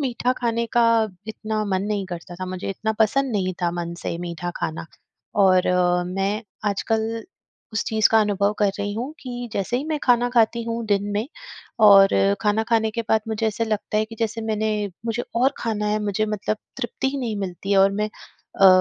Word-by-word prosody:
मीठा 250 -2 0
खाने 235 -1 0
का 235 - +6 0.4
इतना 215 0 -3
मन 190 -2 0
नहीं 205 -1 -1
करता 175 -1 -7
था, 185 +1 -5
मुझे 185 0 -5
इतना 220 +3 -2
पसंद 260 +4 +2
नहीं 185 -3 0
था 175 - +2
मन 170 0 -4
से - - -2
मीठा 175 0 -4
खाना 160 +1 -4 0.6
और 185 -1 +5 0.4
मैं 195 +4 -1 0.3
आजकल 225 +2 -1 0.5
उस 215 - 0
चीज़ 220 -1 +3
का 225 - +5
अनुभव 205 -1 +1
कर 205 -1 +3
रही 205 0 -2
हूँ, 250 +7 -4
कि 245 -2 -6
जैसे 200 +5 -1
ही 265 - -2
मैं 310 -1 -1
खाना 245 -1 +3
खाती 235 -1 +3
हूँ 230 0 -3
दिन 200 -1 +1
में 210 +3 -1 0.6
और 195 -2 +9 0.3
खाना 210 +1 +2
खाने 225 -1 +2
के 230 +2 -3
बाद 220 - +4
मुझे 220 0 -1
ऐसा 220 +1 -1
लगता 215 -1 -2
है 215 - +2
कि 225 +1 -11
जैसे 225 0 -1
मैंने 220 0 0 0.4
मुझे 230 +1 -1
और 260 +4 +3
खाना 215 -2 -2
है 210 0 +1
मुझे 210 +1 0
मतलब 210 0 -2 0.2
तृप्ति 265 +1 -2
ही 280 +1 -3
नहीं 235 -5 -2
मिलती 190 0 -5
है 195 - +5
और 195 +1 +6
मैं 210 +1 -1 0.5
अ, 195 - +9
215 Hz, 200 wpm, -23 LUFS, 195-230 Hz, 0.6 s, और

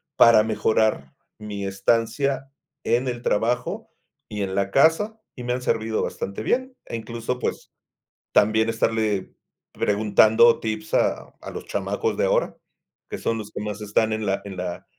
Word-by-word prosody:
para 115 -2 +7
mejorar 110 -8 +1 0.3
mi 105 -2 -5
estancia 115 +7 0 0.3
en 120 +3 +1
el 120 -1 -3
trabajo 120 +4 -1 0.4
y 105 -1 -3
en 95 -1 -3
la 100 0 0
casa? 165 - +3 0.2
Y 125 - -8
me 125 0 -1
han 125 - -3
servido 110 -2 0
bastante 100 +2 -4
bien, 255 - -1
e, - - -6
incluso, 115 +2 -4
pues, - - -4 0.6
también 110 +2 +4
estarle 110 -3 0 0.4
preguntando 110 +3 +4
tips 110 -1 -4
a - - +1
a - - -7
los - - -7
chamacos - - -2
de - - +2
ahora, - - +1 0.5
que - - -4
son 115 - -1
los 105 -1 -7
que - - -5
más 105 0 -5
están 105 +1 +1
en 110 0 -2
la 100 -1 0
en 100 -2 -7
la 90 -1 -5
110 Hz, 160 wpm, -24 LUFS, 105-120 Hz, 0.6 s, para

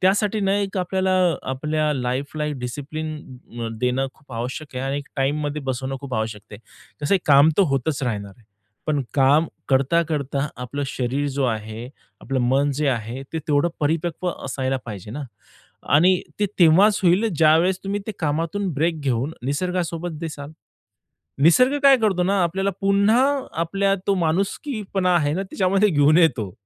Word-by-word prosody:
त्यासाठी 205 +3 +2
ना, 195 -1 +1
एक 200 -1 -2
आपल्याला 190 +1 0 0.4
आपल्या 150 +3 0
लाईफला 135 +4 -2
डिसिप्लिन 145 +6 -5 0.5
अ, 115 - -2
देणं 125 +3 0
खूप 140 -4 -18
आवश्यक 130 +5 -5
आहे 130 - -2
आणि 135 +1 -1
एक, 145 - -9
टाईममध्ये 145 +2 -1
बसवणं 130 0 -3
खूप 140 -3 -6
आवश्यक 110 -1 -3
आहे. 105 - -9 0.4
कसं 145 +6 +2
आहे 195 - +4
काम 145 +1 +7
तर 200 - +7
होतंच 140 +2 -1
राहणार 105 -5 -3
आहे. 120 - -24 0.4
पण 150 -2 +1
काम 145 +4 +4 0.2
करता-करता 140 0 +1
आपलं 125 +4 -5
शरीर 135 +1 -2
जो 140 0 -1
आहे, 110 0 -3 0.3
आपलं 135 -1 -2
मन 135 +4 +2
जे 150 +1 -1
आहे, 120 +1 -3
ते 160 - -2
तेवढं 150 +3 +3
परिपक्व 165 +4 -1 0.2
असायला 135 0 -1
पाहिजे 105 -3 -8
ना, 145 +6 -5 0.7
आणि 180 +5 +5 0.2
ते 205 - +3
तेव्हाच 190 +5 +5
होईल, 185 +5 +3
ज्यावेळेस 165 +4 +4
तुम्ही 200 +1 -2
ते 220 - -3
कामातून 165 +5 -1
ब्रेक 160 +2 0
घेऊन 135 +1 -1
निसर्गासोबत 170 +1 -2
दिसाल. 150 -3 -6 0.9
निसर्ग 255 - +5
काय 275 -1 +7
करतो 205 -6 +1
ना, 190 +1 +2
आपल्याला 190 +3 0
पुन्हा 200 +4 +3 0.4
आपल्या 195 +3 +1
तो 200 - +4
माणुसकीपणा 195 - -1
आहे 145 -3 +1
ना 190 - -1
त्याच्यामध्ये 195 +1 +1
घेऊन 150 -1 +4
येतो. 120 - +2
150 Hz, 155 wpm, -22 LUFS, 135-185 Hz, 0.9 s, काम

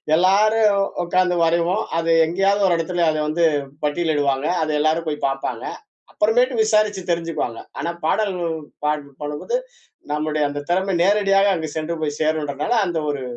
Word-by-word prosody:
எல்லாரும் 205 +3 +4 0.3
உட்கார்ந்து 180 0 +1
வரைவோம். 170 +5 +1
அது 165 0 +1
எங்கயாவது 195 +4 +1
ஒரு 175 - +3
இடத்துல 170 +1 0 0.2
வந்து 165 +2 +1 0.4
பட்டியலிடுவாங்க. 145 -3 0
அதை 155 -1 0
எல்லாரும் 160 +2 +1
போய் 150 - -3
பார்ப்பாங்க. 135 0 -4 0.5
அப்புறமேட்டு 245 +4 +2
விசாரிச்சு 215 -2 +2
தெரிஞ்சுக்குவாங்க. 165 -8 -2 0.2
ஆனா 170 - -2 0.2
பாடல் 200 +3 +1 0.5
பாட 150 0 +2 0.3
பண்ணும் 145 0 -4
போது 485 - 0 0.6
நம்முடைய 150 0 -1
அந்த 145 0 -5
திறமை 190 +1 +1
நேரடியாக 200 0 +3
அங்கு 160 -2 -4
சென்று 165 +2 -3
போய் 145 -1 -2
சேரும்றனால 155 - -1
அந்த 170 -3 -2
ஒரு 140 -2 -5
170 Hz, 140 wpm, -21 LUFS, 155-195 Hz, 0.6 s, எல்லாரும்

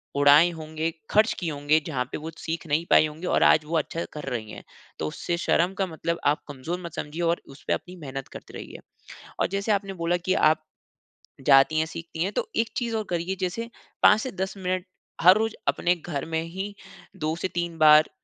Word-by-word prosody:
उड़ाए 145 +4 +7
होंगे, 160 0 -3 0.2
खर्च 215 +2 +4
किए 170 -3 -2
होंगे 145 +2 +2
जहाँ 135 -6 -1
पे - - -3
वो 160 +2 -6
सीख 165 0 -4
नहीं 155 +3 +1
पाई - - +6
होंगी 155 +4 -7
और - - +3
आज 155 - +5
वो 165 +2 0
अच्छा 165 +2 -2
कर 150 - -7
रही 110 -3 -4
हैं। - - -9 0.4
तो 80 - -1
उससे 170 - -3
शर्म 175 +1 +2
का 195 - +2
मतलब 170 0 -3
आप 145 +1 +3
कमज़ोर 145 +5 -5
मत 170 - -7
समझिए 150 +4 -5
और 170 0 +1
उस 135 +1 -14
पे - - +2
अपनी 180 - -5
मेहनत 135 -4 -6
करते - - -11
रहिए। - - -9 0.6
और - - +3
जैसे 200 +2 0
आपने 200 -1 -1
बोला 170 0 0
कि 185 +2 -1
आप 155 0 +3 0.9
जाती 140 +3 +6
हैं, 160 - +2
सीखती 165 0 -5
हैं, 195 - -1
तो 475 - -1
एक 225 0 +1
चीज़ 235 -2 -1
और 220 - 0
करिए 175 +2 -1
जैसे 210 +6 -2 0.3
5 210 - +7
से 260 - -4
10 190 0 -3
मिनट 185 -1 -2 0.4
हर 180 +3 +8
रोज़ 220 0 0
अपने 175 +1 +2
घर 155 -4 -5
में 160 0 -1
ही 190 +5 -5 0.5
2 155 +1 0
से 170 - -2
3 170 -1 -2
बार 155 0 +7
165 Hz, 215 wpm, -26 LUFS, 155-185 Hz, 0.9 s, हर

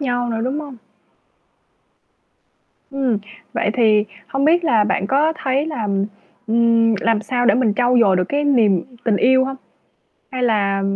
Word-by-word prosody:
nhau 245 -3 -2
nữa, 225 -1 -3
đúng 270 +4 -2
hông? 285 -4 -9 2.1
Ừm, 265 -5 -1 0.3
vậy - - -1
thì 215 -4 +3 0.2
không 270 0 -1
biết 335 +3 +3
là 220 -8 +3
bạn 195 -1 -1
có 290 +8 +2
thấy 270 +3 0
là, 235 -10 -4 0.6
ừm, 230 0 +2
làm 225 -1 +1
sao 245 +2 -1
để - - +4
mình 230 -4 +1
trau 245 +2 +2
dồi 195 -5 +4
được 180 - +1
cái 290 +1 -1
niềm 220 -11 +2 0.2
tình 225 -4 +2
yêu 260 +4 +3
hông? 270 0 -5 0.7
Hay 255 -2 -4
là 200 -4 +1
245 Hz, 160 wpm, -19 LUFS, 215-270 Hz, 2.1 s, để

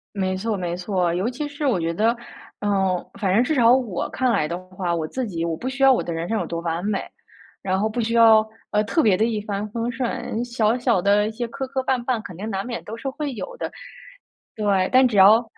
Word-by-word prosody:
没 185 -1 0
错 215 +2 -2
没 175 -1 -3
错。 180 -2 0
尤 190 +7 0
其 290 +4 -4
是 290 0 -5
我 235 -10 +2
觉 165 0 -1
得， 225 +6 +2 0.4
嗯， 195 -3 0 0.2
反 190 -3 +1
正 235 +5 +4
至 310 +4 0
少 235 -2 +5
我 240 -9 -1
看 255 -2 0
来 155 -9 +1
的 170 +2 -3
话， 180 -2 -2
我 160 -2 -2
自 255 +6 -3
己 170 -5 -3
我 165 -1 -1
不 250 +10 -4
需 270 +1 -2
要 270 - +8
我 250 - +2
的 170 - -4
人 165 +1 -3
生 225 - 0
有 - - -2
多 170 - -4
完 170 +1 -2
美， 205 -2 0 0.6
然 190 0 0
后 215 - +1
不 235 +2 -2
需 230 +1 -1
要， 220 -1 +6 0.2
呃， 210 0 +2
特 320 +9 +1
别 210 -8 +4
地 220 +4 +2
一 220 -2 -1
帆 205 0 -3
风 230 +1 -2
顺。 240 -1 -3
小 235 -1 +1
小 235 -7 +2
的 205 +2 +3
一 - - -3
些 240 +1 -4
磕 265 +3 -5
磕 265 0 -2
绊 255 -2 0
绊， 240 -3 -1
肯 180 - -9
定 210 +5 -5
难 195 0 -3
免 235 -2 -5
都 220 - -7
是 270 +4 -4
会 290 0 -4
有 - - -6
的。 - - -4 0.8
对， 200 -3 +1
但 255 0 +7
只 220 - -4
要 215 +5 +7
215 Hz, 270 characters per minute, -23 LUFS, 185-245 Hz, 0.8 s, 要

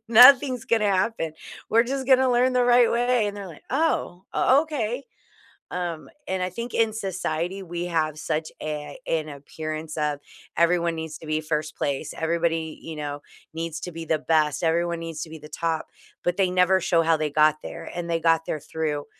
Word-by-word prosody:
Nothing's 250 +1 +7
gonna 215 -3 +2
happen. 185 -4 0 0.4
We're 230 +1 +5
just 265 +1 -3
gonna 260 -1 +5
learn 250 +1 +3
the 250 -1 +4
right 245 -1 +5
way." 240 -2 +2
And 205 - -4
they're 200 -1 -6
like, 165 -4 -12
"Oh, 265 - 0
o 275 +4 +4
okay." 275 -4 -3 0.7
Um, 175 -3 -4 0.2
and 190 -1 -1
I 180 - 0
think 235 +6 -6
in 225 -2 +2
society, 185 -2 -3
we 175 -1 -4
have 155 -3 0
such 155 0 -2
a 150 -1 -5
an 155 -2 -1
appearance 155 +2 -6
of 150 -1 0 0.4
everyone 170 0 +3
needs 160 -1 -6
to 160 - -11
be 155 0 0
1st 155 -1 -2
place. 140 -2 -2
Everybody, 165 -1 -1
you 160 -1 -7
know, 145 -1 -5 0.3
needs 165 -1 -4
to 180 - -5
be 165 0 -6
the 160 0 +1
best. 155 -1 +1
Everyone 170 +1 +1
needs 165 -2 -6
to 160 - -9
be 160 - -8
the 150 - -12
top, 165 0 -2 0.4
but 175 +1 0
they 190 -2 +3
never 185 +1 +4
show 170 -2 +3
how 165 0 +3
they 155 -1 -1
got 155 +1 +4
there. - - -8
And 175 -1 -4
they 165 0 +1
got 165 0 +3
there 155 - -2
through 150 -1 -3
170 Hz, 195 wpm, -25 LUFS, 155-210 Hz, 0.7 s, Nothing's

